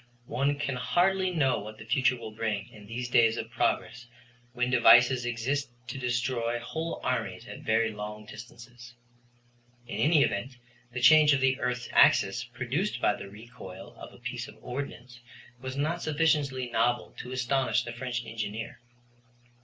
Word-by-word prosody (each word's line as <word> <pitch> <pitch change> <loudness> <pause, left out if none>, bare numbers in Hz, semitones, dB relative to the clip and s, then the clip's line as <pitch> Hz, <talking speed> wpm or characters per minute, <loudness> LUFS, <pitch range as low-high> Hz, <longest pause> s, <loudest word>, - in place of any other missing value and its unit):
One 140 +4 0
can 140 -3 -2
hardly 185 +6 +2
know 145 -7 +1
what 110 +1 -9
the 110 - -11
future 125 +2 +2
will 115 -2 -8
bring 105 -2 -3
in 105 -1 -14
these 120 +3 -4
days 115 -1 +4
of - - -5
progress 120 +1 -1 0.4
when 125 0 -1
devices 125 0 +6
exist 125 +4 -1 0.2
to 130 - -5
destroy 120 -1 -1
whole 160 +7 -4
armies 115 -8 -2
at 105 - -8
very 110 0 +1
long 105 0 -7
distances. 120 +2 -12 0.9
In - - -6
any 155 -1 +5
event, 125 +6 -2 0.3
the 125 0 -4
change 150 +4 +7
of 140 - +2
the 135 0 +2
earth's 125 -1 -2
axis, 95 +5 +4
produced 130 - -3
by - - +3
the 100 -1 -9
recoil 100 -3 -11
of - - -11
a - - -15
piece - - -5
of - - -13
ordnance, 125 -2 -6 0.4
was 130 +1 -5
not 160 +4 -1
sufficiently 145 -4 +1
novel 120 +1 +1
to 125 - -7
astonish 130 +1 +1
the 120 - -6
French 120 0 -4
engineer. 115 0 -5
125 Hz, 160 wpm, -28 LUFS, 115-135 Hz, 0.9 s, change